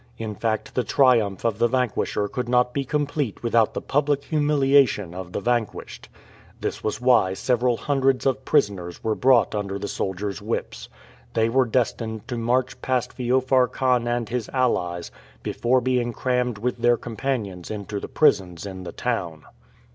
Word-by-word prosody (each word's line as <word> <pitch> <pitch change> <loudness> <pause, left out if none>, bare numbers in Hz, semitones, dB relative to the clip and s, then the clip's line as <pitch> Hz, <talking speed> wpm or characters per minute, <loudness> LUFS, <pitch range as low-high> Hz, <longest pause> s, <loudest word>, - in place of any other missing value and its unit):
In 110 -1 -4
fact, 110 +1 -2
the 125 - 0
triumph 120 -9 +2
of 115 -2 0
the 120 - +4
vanquisher 120 -4 0
could 125 +3 -4
not 125 0 +2
be 140 - -1
complete 145 -4 -2
without 115 -2 +2
the - - -3
public 145 0 +1
humiliation 140 - +2
of 90 -1 -7
the - - -2
vanquished. 120 +1 -2 0.5
This - - -4
was 105 0 -2
why 120 -7 +3
several 125 +1 +1
hundreds 135 -2 +1
of 135 0 +1
prisoners 100 - 0
were 110 - +1
brought 125 -3 +3
under 100 -2 -3
the 100 +1 -4
soldiers' 100 +2 -3
whips. 110 +3 -4 0.5
They 115 0 +2
were 130 +2 +3
destined 110 -2 -1
to 125 - -2
march 125 +2 0
past 125 -1 -1
Feofar 130 +1 +2
Khan 125 -2 +1
and 120 -1 -1
his 120 0 -3
allies 90 -10 -1 0.3
before 125 +2 +1
being 125 -1 0
crammed 125 -2 -1
with 125 +3 -2
their 120 0 +4
companions 110 -7 -4
into 105 -1 -4
the - - -6
prisons 90 -2 +2
in 95 -2 -7
the - - -6
town. 90 -11 -3
120 Hz, 160 wpm, -24 LUFS, 105-130 Hz, 0.5 s, the